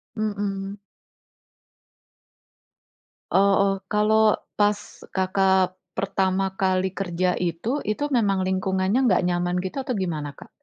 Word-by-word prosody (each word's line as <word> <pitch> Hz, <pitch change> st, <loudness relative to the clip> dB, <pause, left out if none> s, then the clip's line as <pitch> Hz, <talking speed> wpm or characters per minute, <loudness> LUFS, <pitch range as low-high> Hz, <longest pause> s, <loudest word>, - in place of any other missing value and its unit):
Mhm. 200 Hz, -2 st, -3 dB, 2.5 s
Oh -, -, +5 dB, 0.2 s
oh, 195 Hz, -, +3 dB
kalau 215 Hz, 0 st, +3 dB, 0.2 s
pas 205 Hz, 0 st, +4 dB, 0.4 s
Kakak 190 Hz, -1 st, +2 dB, 0.2 s
pertama 190 Hz, 0 st, 0 dB
kali 185 Hz, 0 st, +1 dB
kerja 180 Hz, -1 st, -1 dB
itu, 180 Hz, -, -1 dB
itu 215 Hz, +7 st, -1 dB
memang 200 Hz, -7 st, +2 dB
lingkungannya 190 Hz, +3 st, 0 dB
nggak 190 Hz, -4 st, +3 dB
nyaman 175 Hz, 0 st, 0 dB
gitu 185 Hz, -, -5 dB
atau 250 Hz, -, -1 dB
gimana, 155 Hz, -, -3 dB
Kak? -, -, -14 dB
190 Hz, 105 wpm, -24 LUFS, 185-205 Hz, 2.5 s, Oh